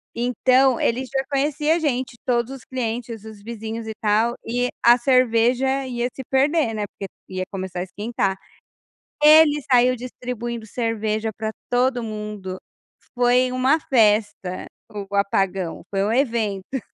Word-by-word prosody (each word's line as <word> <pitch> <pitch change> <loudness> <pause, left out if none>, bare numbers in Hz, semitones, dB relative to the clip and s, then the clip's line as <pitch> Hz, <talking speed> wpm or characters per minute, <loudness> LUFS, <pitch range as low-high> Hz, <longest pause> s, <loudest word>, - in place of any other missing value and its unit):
então 255 +1 +3
ele 250 +3 +1
já 265 +1 -2
conhecia 295 +2 +1
a - - 0
gente, 260 -6 -1
todos 240 +1 0
os 270 - -10
clientes, 230 -3 -4
os 215 -2 -11
vizinhos 225 0 -6
e 220 - -4
tal, 220 +3 +2
e 245 +2 0 0.2
a 240 +1 +8
cerveja 255 +1 +2
ia 240 -1 -1
se 265 - -7
perder, 275 -2 +2
né, 210 -1 -2
porque 195 0 -9 0.2
ia 185 0 -3
começar 190 -2 -5
a - - -1
esquentar. 195 0 -2 0.9
Ele 300 -1 +7
saiu 250 0 +5
distribuindo 240 -2 -6
cerveja 220 -1 -2
para 220 0 -2 0.2
todo 245 0 +1
mundo, 210 -4 -6 0.6
foi 250 +1 +3
uma 260 +5 +3
festa 210 - +1 0.3
o 200 -1 -6
apagão, 195 -3 0
foi 195 -1 0
um 210 - 0
evento. 230 -2 -1
235 Hz, 140 wpm, -22 LUFS, 210-255 Hz, 0.9 s, a